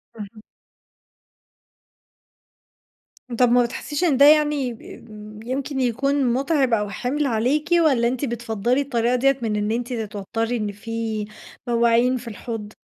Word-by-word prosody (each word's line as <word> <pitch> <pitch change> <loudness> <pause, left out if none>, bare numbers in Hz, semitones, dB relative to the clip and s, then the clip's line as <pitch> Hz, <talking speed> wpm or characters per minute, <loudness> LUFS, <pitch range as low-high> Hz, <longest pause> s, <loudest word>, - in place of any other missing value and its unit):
اهم. 215 0 -10 3.0
طب 245 -1 +5
ما 245 0 +5
بتحسيش 285 +7 -4
إن 300 -7 +2
ده 280 - +7
يعني 295 -4 +3
ب 215 -1 -12
يمكن 265 +2 -3
يكون 260 +1 +1
مُتعب 270 -1 +1
أو 210 -2 +1
حِمل 260 +8 -2
عليكِ؟ 270 +6 0
والَّا 300 -9 +3
أنتِ 255 +3 -2
بتفَضّلي 235 +1 -1
الطريقة 245 -3 0
ديَّة 270 +2 +2
من 220 -2 -1
إن 210 +1 -1
أنتِ 240 +2 -3
تتوتّري 225 +2 -3
إن 210 -2 -3
في 220 0 -4 0.4
مواعين 235 +1 +3
في 240 0 -10
الحوض؟ 215 -1 -7
240 Hz, 130 wpm, -22 LUFS, 225-270 Hz, 3.0 s, ده